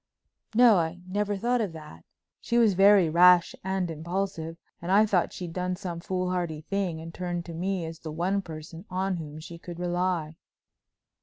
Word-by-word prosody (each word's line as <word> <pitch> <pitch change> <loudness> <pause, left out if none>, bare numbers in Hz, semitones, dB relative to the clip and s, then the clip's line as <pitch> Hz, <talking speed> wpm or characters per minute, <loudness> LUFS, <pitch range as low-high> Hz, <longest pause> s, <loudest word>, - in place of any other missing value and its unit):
"No, 235 -3 +7
I 165 +1 -1
never 205 +1 -1
thought 240 +4 +1
of 200 -6 -2
that. 150 - -11 0.3
She 235 - -1
was 225 -4 +5
very 195 -1 +6
rash 175 +2 +6
and 190 -2 -1
impulsive 165 0 -3 0.2
and 170 +2 -3
I 210 +3 +6
thought 190 -5 +1
she'd 175 -3 -7
done 180 0 -2
some 180 -3 -5
foolhardy 180 -3 -2
thing 185 -1 -2
and 165 +1 -8
had - - -16
turned 175 -1 -3
to 170 - -7
me 180 +1 -2
as 160 0 -7
the 160 - -7
one 180 +5 0
person 165 0 -9
on 185 0 -1
whom 155 -2 -7
she 170 +1 -10
could 175 0 -9
rely." 175 -3 -1
180 Hz, 180 wpm, -27 LUFS, 165-195 Hz, 0.3 s, No